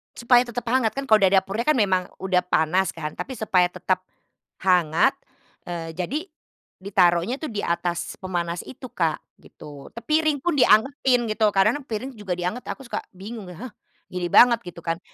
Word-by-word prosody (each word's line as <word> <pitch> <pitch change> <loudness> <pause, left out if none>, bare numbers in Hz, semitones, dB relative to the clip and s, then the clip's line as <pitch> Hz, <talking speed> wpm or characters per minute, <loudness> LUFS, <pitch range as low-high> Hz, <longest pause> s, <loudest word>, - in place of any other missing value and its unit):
Supaya 245 +1 +4
tetap 245 0 -5
hangat, 240 -3 +2
kan. 275 0 -5
Kalau 215 - +7
dari 195 -2 +3
dapurnya 195 +4 +1
kan 305 - +4
memang 190 -4 +2 0.2
udah 185 -1 +1
panas, 180 +2 +1
kan. 155 -2 -6
Tapi 260 - -5
supaya 195 -6 +2
tetap 185 +1 -2 0.6
hangat, 180 - +3 0.5
eee, 170 -2 -5
jadi 185 - -2 0.6
ditaruhnya 185 +4 +2
tuh 310 - -4
di 210 -3 -3
atas 170 0 -2
pemanas 175 -2 -3
itu, 260 +1 -10
Kak, 165 -3 0 0.2
gitu. 145 -2 -12
Te 235 - -7
piring 310 0 +2
pun 350 - +1
dianggetin, 250 0 +3
gitu. 215 0 +2
Karena 205 +7 +2
piring 260 +1 -5
juga 200 -6 -4
dianggetin, 180 +8 -4
aku 270 - -6
suka 240 - -4
bingung, 200 +1 -8
"Hah, 240 +7 -9 0.4
gini 180 -1 -3
banget," 235 +4 +6
gitu, 175 -1 -9
kan. 165 0 -1
195 Hz, 170 wpm, -24 LUFS, 180-245 Hz, 0.6 s, Kalau